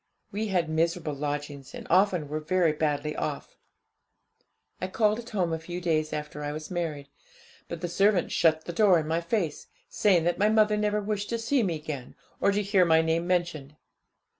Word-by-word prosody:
We 215 +2 -2
had 180 -5 +1
miserable 160 0 0
lodgings, 145 -1 -5
and - - -8
often 185 -4 +3
were 155 +2 -3
very 165 +1 +2
badly 150 0 -1
off. - - -4 1.3
I 185 - -1
called 215 +3 +1
at 240 0 -9
home 180 -6 0
a 160 - -2
few 175 +2 -6
days 155 -3 0
after 150 0 -5
I 145 - -2
was 155 +2 -7
married; 155 -5 -3 0.6
but 170 -1 -6
the 175 - -2
servant 195 +1 +2
shut 160 -1 +2
the 175 - -5
door 195 -1 +5
in 155 - -4
my 165 +2 0
face, 170 -4 -2 0.2
saying 185 -5 +3
that 175 +2 0
my 210 +1 +4
mother 215 -1 +4
never 210 0 0
wished 205 0 -3
to 235 - -1
see 235 +4 +1
me 180 -6 0
again, 150 -5 -7 0.2
or - - +3
to 205 +1 0
hear 195 -2 +3
my 160 -1 +4
name 165 +1 0
mentioned. 170 -5 -1
170 Hz, 190 wpm, -27 LUFS, 155-200 Hz, 1.3 s, door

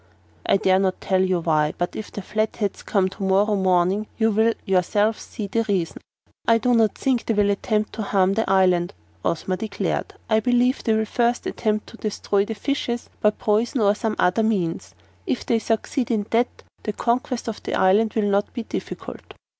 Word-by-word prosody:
"I - - +4
dare 190 -1 +3
not 190 -1 0
tell 190 -1 +1
you 185 -2 +1
why, 155 -2 +1
but 175 - -2
if 215 - -6
the 205 - -6
Flatheads 215 0 -2
come 195 -3 +1
to 195 - -13
morrow 195 +2 +2
morning 190 +2 +2
you 225 -1 +2
will 220 +2 +2
yourselves 205 +4 +1
see 215 - -6
the 215 +4 0
reason." 180 -5 -1 0.5
"I 230 - +6
do 245 +2 +1
not 225 -3 +3
think 260 -3 0
they 225 - +1
will 205 -1 +3
attempt 210 +1 -1
to 225 - -4
harm 195 -2 +2
the 225 0 -1
island," 185 -2 +3 0.3
Ozma 185 +3 -1
declared. 215 -1 -3
"I 220 -1 +3
believe 245 +3 +2
they 225 - +2
will 220 0 +1
first 240 +2 0
attempt 215 -1 -1
to 230 - -13
destroy 205 -2 0
the 225 - -5
fishes, 240 0 -3
by 210 - +5
poison 220 +4 0
or 200 -1 +4
some 220 0 -2
other 180 +5 +2
means. 170 - -1 0.3
If 125 - -1
they 230 - +2
succeed 225 +3 -1
in 215 -4 0
that, 235 +2 0 0.2
the 210 - -3
conquest 245 +3 -1
of 225 - -4
the - - -3
island 205 +4 +3
will 215 -2 +1
not 200 +1 +1
be 235 - -3
difficult." - - -7
210 Hz, 195 wpm, -23 LUFS, 190-225 Hz, 0.5 s, I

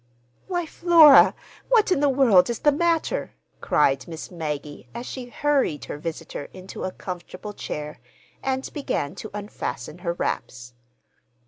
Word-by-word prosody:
"Why, 350 -2 -1
Flora, 320 -4 +7 0.3
what 445 -5 +4
in 365 - +3
the 290 0 +3
world 240 -9 +5
is 235 - -1
the 295 - +3
matter?" 340 - 0 0.2
cried 135 -3 +2
Miss 160 +1 -8
Maggie, 150 -4 -5
as 240 +1 -5
she 255 -1 -6
hurried 275 - 0
her 145 - -6
visitor 165 -2 -6
into 185 0 -7
a 185 - -3
comfortable 185 +3 -7
chair 150 -5 -6 0.4
and 265 0 -2
began 210 - -2
to 215 - -8
unfasten 175 - -6
her 170 -1 -2
wraps. 125 -7 -4
205 Hz, 140 wpm, -24 LUFS, -, 0.4 s, Flora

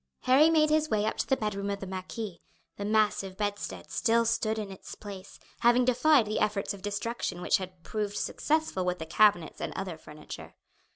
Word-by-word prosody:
Harry 275 +5 +6
made 310 -2 +4
his 310 0 +2
way 210 -3 +1
up 220 - 0
to - - -1
the 265 - +2
bedroom 200 -2 -2
of 200 0 -2
the 195 - -6
marquis. 190 0 -6 0.4
The 200 - -4
massive 210 -3 +1
bedstead 205 -1 -4
still 230 -1 +2
stood 220 -1 +1
in 210 -2 -4
its 190 - -9
place, 200 -2 -10 0.2
having 240 +1 +4
defied 255 +1 +4
the 215 +1 -1
efforts 210 -1 0
of 200 - -10
destruction 205 -2 -3
which 180 - +2
had 185 -2 -9
proved 210 -1 -3
successful 310 -11 0
with 180 0 -1
the 160 - -6
cabinets 175 -1 +3
and - - -3
other 185 -4 -4
furniture. 150 -1 -10
210 Hz, 190 wpm, -29 LUFS, 190-230 Hz, 0.4 s, Harry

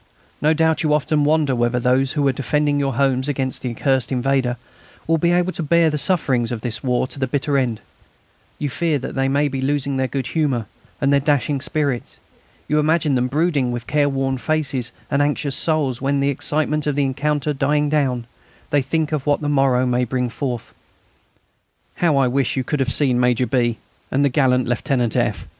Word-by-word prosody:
No 155 +2 +3
doubt 160 0 +2
you 150 -2 +2
often 150 0 +1
wonder 150 -3 +2
whether 120 0 +1
those 130 +2 +1
who 145 -3 +1
are - - +4
defending 145 +2 0
your 135 -3 -1
homes 130 0 +1
against 135 -2 -1
the 125 - -3
accursed 130 +2 0
invader 130 -1 0 0.5
will 165 0 +1
be 170 +2 +2
able 175 +1 +2
to 175 - -5
bear 165 +1 +3
the 150 - -1
sufferings 135 -7 +1
of 115 -3 -4
this 115 -2 -4
war 125 -1 +1
to 135 - -9
the 130 - 0
bitter 140 +2 -1
end; 120 -6 0 0.8
you 145 - -2
fear 160 +2 0
that 135 - -6
they 135 0 0
may 145 +2 +2
be 135 -1 -3
losing 140 0 -1
their 130 0 0
good 135 -1 -3
humour 135 -5 -1 0.3
and 140 0 +2
their 140 - +5
dashing 145 -1 0
spirits; 145 -5 -2 0.5
you 150 - +2
imagine 155 -1 +2
them 125 -1 +1
brooding 145 -2 0
with 120 -1 -5
careworn 135 -2 0
faces 135 -5 -1 0.2
and 140 - +2
anxious 145 -1 0
souls 150 -7 0
when, 140 +1 0
the 140 +1 +1
excitement 150 +2 -1
of 145 - 0
the 145 - +1
encounter 150 +2 -1
dying 145 +2 +1
down, 135 -5 0 0.5
they 145 - +3
think 155 +3 -1
of 150 -2 -2
what 145 - +2
the 145 - -2
morrow 135 -3 +2
may 125 0 +1
bring 125 0 -1
forth. 125 -2 -5 1.2
How 160 -5 +2
I 135 -2 +3
wish 135 +1 0
you 130 - 0
could 150 +3 -2
have 130 -1 0
seen 130 -4 +2
Major 125 0 +2
B. 120 -3 0 0.3
and 140 +2 +2
the - - +3
gallant 125 -2 +2
Lieutenant 120 -1 0
F. - - -1
140 Hz, 200 wpm, -20 LUFS, 125-150 Hz, 1.2 s, their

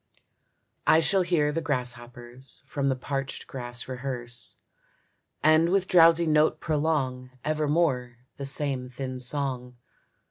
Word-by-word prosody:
I 160 - +6
shall 190 +4 +2
hear 170 -4 +1
the 165 +2 -2
grasshoppers 125 -2 -5
From 140 -2 -1
the 130 - +1
parched 135 +1 -4
grass 120 -2 -5
rehearse, 125 -2 -6 0.9
And 155 +2 +5
with 190 0 +1
drowsy 170 -1 +6
note 155 -1 +3
prolong 145 -5 -1 0.2
Evermore 150 -5 0 0.2
the 140 - -5
same 135 -3 -1
thin 130 0 -5
song. 125 -2 -1
135 Hz, 115 wpm, -27 LUFS, 125-155 Hz, 0.9 s, I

